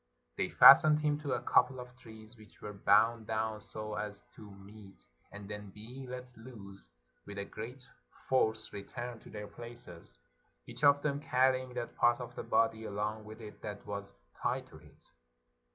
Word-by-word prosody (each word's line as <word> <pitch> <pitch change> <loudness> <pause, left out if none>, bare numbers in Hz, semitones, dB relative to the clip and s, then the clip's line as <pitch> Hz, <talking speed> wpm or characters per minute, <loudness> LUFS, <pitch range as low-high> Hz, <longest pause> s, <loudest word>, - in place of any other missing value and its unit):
They - - -1
fastened 155 0 +9
him 150 -1 +1
to 145 -3 -2
a - - -1
couple 130 0 +3
of 125 0 -10
trees 110 -2 -13
which 110 -2 -18
were 105 - -7
bound 110 +3 +3
down 110 -1 -2
so 110 0 -6
as 105 -1 -4
to 105 - -12
meet, 100 0 -14 0.3
and 100 0 -9
then 105 -1 -7
being 120 +7 -10
let 125 0 -8
loose, 110 -5 -12 0.4
with 100 0 -8
a 100 - -3
great 125 +6 -9 0.4
force 110 -4 +1
returned 120 +4 -7
to - - -14
their 105 -1 -7
places, 105 - -10 0.5
each - - -10
of 145 0 +6
them 145 -2 0
carry 130 -2 +3
ing 130 -1 -10
that 120 -1 -4
part 120 +1 +4
of 125 - -7
the - - -4
body 110 0 +1
along 105 +1 -3
with 110 +1 -10
it 105 -1 -11
that 105 -1 -7
was 100 -1 -6 0.3
tied - - -1
to - - -13
it. - - -19
110 Hz, 180 wpm, -33 LUFS, 105-125 Hz, 0.5 s, fastened